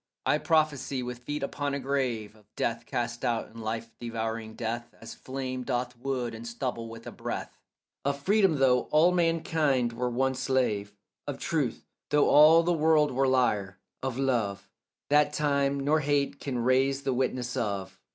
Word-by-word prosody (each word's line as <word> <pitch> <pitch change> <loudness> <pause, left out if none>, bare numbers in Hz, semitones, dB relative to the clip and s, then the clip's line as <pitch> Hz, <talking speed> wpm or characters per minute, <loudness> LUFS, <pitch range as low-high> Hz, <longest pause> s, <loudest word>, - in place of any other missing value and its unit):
I - - +3
prophesy, 150 -5 +1
with 125 0 -5
feet 145 +4 -4
upon 140 0 -2
a - - -2
grave, 125 -6 -2
Of 105 -1 -22
death 115 0 -2
cast 120 0 -3
out 115 -2 0
and 115 0 -10
life 115 +1 -4
devouring 115 -1 -4
death 120 +1 -4
As - - -9
flame 130 -1 -5
doth 125 -1 -2
wood 125 -1 -3
and 115 +1 -8
stubble 115 -1 -4
with 115 0 -10
a - - -6
breath; - - -6 0.4
Of 140 0 -1
freedom, 195 +1 +3
though 130 -3 +3
all 160 +4 +5
manhood 160 -7 +1
were 125 +1 -1
one 130 +2 +1
slave; 125 -6 0 0.4
Of - - -3
truth, - - -2 0.2
though 150 0 +4
all 160 +3 +7
the 175 +1 +2
world 155 -2 +3
were 135 +1 +2
liar; 105 -7 +1 0.2
of 130 -2 -3
love, 110 -7 0 0.4
That 150 0 +4
time 140 -2 +1
nor 145 +3 +2
hate 140 -1 0
can 135 -3 -3
raze 130 +3 +2
the 135 -1 0
witness 125 -1 -1
of. 95 -3 -3
130 Hz, 170 wpm, -28 LUFS, 115-140 Hz, 0.4 s, all